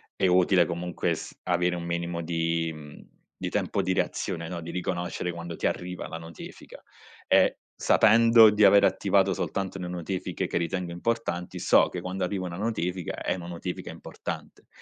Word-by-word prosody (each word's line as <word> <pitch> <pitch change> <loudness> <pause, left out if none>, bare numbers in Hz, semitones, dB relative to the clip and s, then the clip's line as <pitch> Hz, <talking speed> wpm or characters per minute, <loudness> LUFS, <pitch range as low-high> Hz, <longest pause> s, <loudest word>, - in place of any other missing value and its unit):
è 95 - +2
utile 90 0 +4
comunque 85 +1 -2
s - - -9
avere 90 0 +1
un 85 - -5
minimo 85 0 -3
di 85 0 -1
mhmm, 75 -2 -11 0.4
di - - -1
tempo 100 - -1
di 95 0 -1
reazione, 85 -2 -2
no, 85 -1 -5
di 85 - -7
riconoscere 90 -1 -3
quando 85 0 -7
ti - - -4
arriva 90 0 -4
la 80 - -6
notifica, 80 0 -11 0.5
e - - +4 0.2
sapendo 115 0 +6
di 105 0 +2
aver 100 0 +7
attivato - - +2
soltanto 95 -1 -3
le 90 -1 -5
notifiche 90 +1 -3
che - - -2
ritengo 85 +1 -2
importanti, 90 -2 -2
so - - +4
che 90 - -5
quando 90 +1 -4
arriva 95 0 -2
una 85 -1 -5
notifica, 90 -4 -2
è - - -2
una 85 -2 -8
notifica 90 +1 -5
importante - - -8
90 Hz, 170 wpm, -27 LUFS, 85-95 Hz, 0.5 s, aver